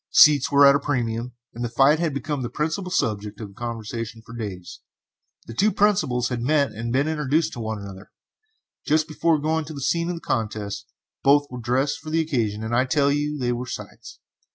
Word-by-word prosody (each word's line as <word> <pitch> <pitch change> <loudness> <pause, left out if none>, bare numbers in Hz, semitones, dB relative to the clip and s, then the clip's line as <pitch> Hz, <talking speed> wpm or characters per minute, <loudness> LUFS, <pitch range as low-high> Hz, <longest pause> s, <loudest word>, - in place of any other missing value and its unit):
Seats 145 -3 +6
were 140 0 +7
at 140 - +8
a 140 - +2
premium, 120 -3 -2 0.2
and 120 - -5
the 120 - -1
fight 135 +6 +4
had 170 -2 0
been 145 0 -3
the 120 - -3
principal 165 +5 -2
subject 105 - -1
of 105 -3 -8
conversation 115 0 -5
for 115 - -10
days. 100 -6 -6 0.7
The 115 - -8
two 205 - +3
principals 155 - +2
had 125 -2 -3
met 140 +2 +2
and 115 +2 -5
been 135 +4 +2
introduced 155 0 0
to - - -7
one 110 -1 -3
another, 100 0 -10 0.7
just 155 +1 +2
before 160 0 +1
going 155 +2 0
to 155 +1 -8
the - - -6
scene 170 +5 0
of 180 - -2
the - - -6
contest. 105 -2 -3 0.3
Both 145 +1 +5
were 125 -1 -6
dressed 130 +5 0
for 155 - -9
the 160 +1 +1
occasion, 115 -9 -1
and 115 +1 -1
I 125 +2 +3
tell 140 +1 +2
you 150 +1 -1
they 125 -3 -1
were 120 +1 -3
sights! - - -9
130 Hz, 205 wpm, -24 LUFS, 115-150 Hz, 0.7 s, at